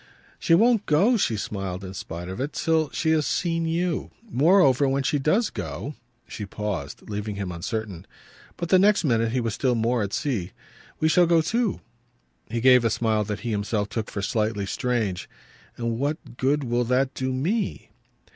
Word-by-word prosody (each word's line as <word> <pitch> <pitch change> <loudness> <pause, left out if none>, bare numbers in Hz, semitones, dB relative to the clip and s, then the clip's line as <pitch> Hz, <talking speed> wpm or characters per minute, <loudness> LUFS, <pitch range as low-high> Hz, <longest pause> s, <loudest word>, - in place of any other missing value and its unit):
"She 165 - +4
won't 225 +2 +3
go," 195 +12 +4
she 120 - +1
smiled 95 -2 -4
in 95 0 -7
spite 85 -2 -6
of 95 +7 -5
it, 145 +3 -3
"till 160 -3 +1
she 160 +1 0
has 155 -2 +2
seen 165 -2 0
you. 170 +1 -1 0.2
Moreover, 145 - +4
when 135 +1 0
she 140 +3 +1
does 190 - +2
go 95 - -5 0.2
" 120 0 -42
She 105 - -7
paused, 100 -7 -5
leaving 105 0 -4
him 100 -3 -4
uncertain. 95 +1 -5 0.5
But 170 - -4
the 185 - +6
next 200 +1 +4
minute 115 -5 +2
he 130 - 0
was 115 -3 -1
still 125 +1 +1
more 115 +1 +1
at 100 -1 -2
sea. 115 - -2 0.5
"We 155 - +2
shall 175 +2 +4
go 165 -1 +4
too." 225 +3 0 0.7
He 115 +1 -2
gave 125 -1 +6
a 115 - +3
smile 110 -1 +1
that 105 0 -4
he 120 - -3
himself 105 0 -1
took 110 0 -3
for 100 - -4
slightly 105 -2 0
strange. 110 -6 -2 0.5
"And 115 -1 -2
what 145 -3 -3
good 140 +4 +1
will 120 0 0
that 130 +2 +1
do 130 0 -2
ME?" 180 - -2
125 Hz, 185 wpm, -25 LUFS, 105-155 Hz, 0.7 s, the